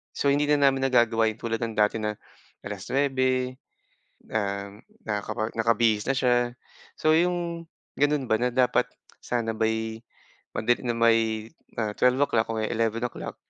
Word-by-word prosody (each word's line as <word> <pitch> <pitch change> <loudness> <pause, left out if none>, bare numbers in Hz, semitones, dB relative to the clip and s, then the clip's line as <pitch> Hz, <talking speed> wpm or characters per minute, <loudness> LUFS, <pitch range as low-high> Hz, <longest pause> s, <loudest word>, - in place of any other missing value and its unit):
So, 140 - +2
hindi 145 +1 +2
na 145 -1 +4
namin 135 0 -2
nagagawa 115 -3 +3
yung 110 - -15
tulad 115 -1 -2
ng 115 -2 -3
dati 105 +1 +3
na 105 -1 -2 0.5
9:00, 130 +4 0 0.8
um, 100 -1 -3 0.2
nakaka 110 +1 -3
nakabihis 115 -1 +2
na 135 - +2
siya. 125 -1 +3 0.6
So, 155 - +3
yung 170 -1 -1 0.3
gano'n 145 -1 +2
ba, 110 - +5
na 125 - +2
dapat 125 0 +2 0.3
sana 115 -2 -2
by 110 0 -1 0.6
pagdating 120 +2 0
ng - - -5
may, 115 -1 +3 0.3
ah, 110 -2 -1
12:00 125 -3 +2
o, 115 - -3
e - - 0
11:00 115 +1 -2
115 Hz, 140 wpm, -26 LUFS, 110-130 Hz, 0.8 s, ba